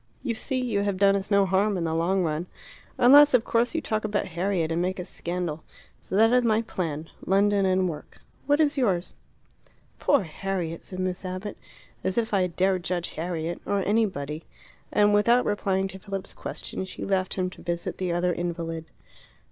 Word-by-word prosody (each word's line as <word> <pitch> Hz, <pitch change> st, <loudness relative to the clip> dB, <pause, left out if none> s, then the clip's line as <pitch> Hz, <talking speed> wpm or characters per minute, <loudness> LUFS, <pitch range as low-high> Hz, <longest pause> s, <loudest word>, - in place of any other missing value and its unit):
You 245 Hz, -, -1 dB
see, 260 Hz, +4 st, -2 dB
you 240 Hz, -5 st, 0 dB
have 200 Hz, -2 st, -1 dB
done 195 Hz, 0 st, +5 dB
us 195 Hz, 0 st, -2 dB
no 200 Hz, -1 st, +4 dB
harm 195 Hz, +2 st, +2 dB
in 175 Hz, -, -1 dB
the 160 Hz, -1 st, -1 dB
long 180 Hz, +3 st, +1 dB
run. 160 Hz, +2 st, -2 dB, 0.5 s
Unless, 285 Hz, +3 st, +8 dB
of 235 Hz, -, +3 dB
course, 235 Hz, +6 st, +1 dB
you 325 Hz, -, +1 dB
talk 215 Hz, -5 st, -2 dB
about 210 Hz, -2 st, -1 dB
Harriet 175 Hz, -1 st, -1 dB
and 165 Hz, +1 st, 0 dB
make 185 Hz, +2 st, -1 dB
a 180 Hz, -, -4 dB
scandal. 170 Hz, -4 st, -4 dB, 0.4 s
So -, -, -6 dB
that 225 Hz, +3 st, +5 dB
is 250 Hz, 0 st, +4 dB
my 225 Hz, -1 st, +2 dB
plan 160 Hz, -7 st, -4 dB
London 200 Hz, 0 st, +3 dB
and 185 Hz, 0 st, +2 dB
work. 150 Hz, -4 st, -7 dB, 0.3 s
What 290 Hz, +1 st, +3 dB
is 300 Hz, -2 st, +2 dB
yours?" 190 Hz, -8 st, 0 dB, 0.9 s
"Poor 285 Hz, -8 st, +3 dB
Harriet!" 170 Hz, 0 st, -4 dB
said 185 Hz, -, -5 dB
Miss 185 Hz, 0 st, -2 dB
Abbott. 185 Hz, +3 st, -5 dB, 0.5 s
"As 190 Hz, +2 st, -1 dB
if 230 Hz, -1 st, 0 dB
I 190 Hz, -2 st, +3 dB
dare 185 Hz, +2 st, +1 dB
judge 175 Hz, -1 st, -3 dB
Harriet! 170 Hz, 0 st, -3 dB
Or 200 Hz, -1 st, +1 dB
anybody." 170 Hz, -8 st, 0 dB, 0.5 s
And 210 Hz, 0 st, +4 dB
without 235 Hz, +4 st, +4 dB
replying 195 Hz, -2 st, 0 dB
to 190 Hz, +1 st, -9 dB
Philip's 195 Hz, 0 st, -6 dB
question -, -, -6 dB
she 185 Hz, -, -7 dB
left 185 Hz, -2 st, 0 dB
him 185 Hz, -1 st, -1 dB
to -, -, -13 dB
visit 170 Hz, 0 st, -3 dB
the 185 Hz, -2 st, -1 dB
other 175 Hz, +1 st, +1 dB
invalid. 165 Hz, -2 st, -4 dB
190 Hz, 190 wpm, -26 LUFS, 175-210 Hz, 0.9 s, Unless